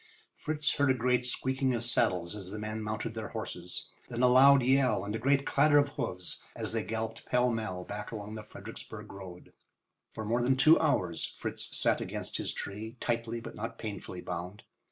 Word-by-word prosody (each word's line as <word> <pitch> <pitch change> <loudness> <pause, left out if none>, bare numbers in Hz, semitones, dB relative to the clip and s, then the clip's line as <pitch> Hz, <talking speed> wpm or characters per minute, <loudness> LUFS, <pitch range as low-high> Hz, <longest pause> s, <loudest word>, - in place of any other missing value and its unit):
Fritz 150 -1 0
heard 145 -1 +3
a 130 - +4
great 125 0 +1
squeaking 130 0 0
of 115 - -1
saddles 90 -6 +2
as 95 -3 -7
the 105 - -6
men 110 +1 -4
mounted 110 +1 -3
their 110 -1 -4
horses. - - -5 0.2
Then 120 0 -1
a - - +8
loud 135 +2 +7
yell 125 -6 +3
and 105 +1 -3
a - - -2
great 140 +3 +3
clatter 145 +1 +5
of 145 -1 +4
hoofs 115 - -3
as - - -3
they - - 0
galloped 110 0 -4
pell 125 0 +3
mell 110 -6 -3
back 105 +2 -6
along 105 -1 -6
the 110 - -5
Fredericksburg 105 - -9
road. 95 -3 -10 0.6
For 110 - -6
more 120 +3 +1
than 130 +2 +3
two 155 +4 +7
hours 95 - 0
Fritz - - -2
sat - - +3
against - - -4
his - - -2
tree, 110 +4 -6
tightly 115 -1 -1
but - - -8
not 115 +2 -5
painfully 100 -4 -6
bound. 90 +4 -5
115 Hz, 195 wpm, -31 LUFS, 105-130 Hz, 0.6 s, a